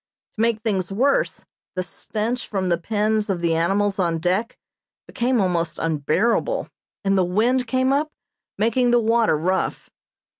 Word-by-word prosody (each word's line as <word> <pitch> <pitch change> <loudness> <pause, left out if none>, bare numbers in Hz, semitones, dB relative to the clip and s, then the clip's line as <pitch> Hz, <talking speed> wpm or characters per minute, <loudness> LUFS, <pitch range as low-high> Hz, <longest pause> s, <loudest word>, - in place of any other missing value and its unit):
To - - -1
make 225 -1 +1
things 195 -5 -1
worse, 265 +8 +1 0.3
the 185 - -1
stench 225 +6 -3
from 190 -3 -2
the 170 -1 +1
pens 215 +2 0
of 190 -3 0
the 170 -1 +1
animals 195 +5 +1
on 170 -3 +1
deck 185 +7 -1 0.5
became 245 +1 0
almost 170 -4 0
unbearable, 170 - 0 0.4
and 195 0 +3
the 190 - +3
wind 230 +8 +1
came 260 +3 +2
up, 300 +2 0 0.5
making 235 +4 +2
the 240 0 +4
water 225 -6 +2
rough. 185 +5 -2
210 Hz, 150 wpm, -22 LUFS, 180-235 Hz, 0.5 s, the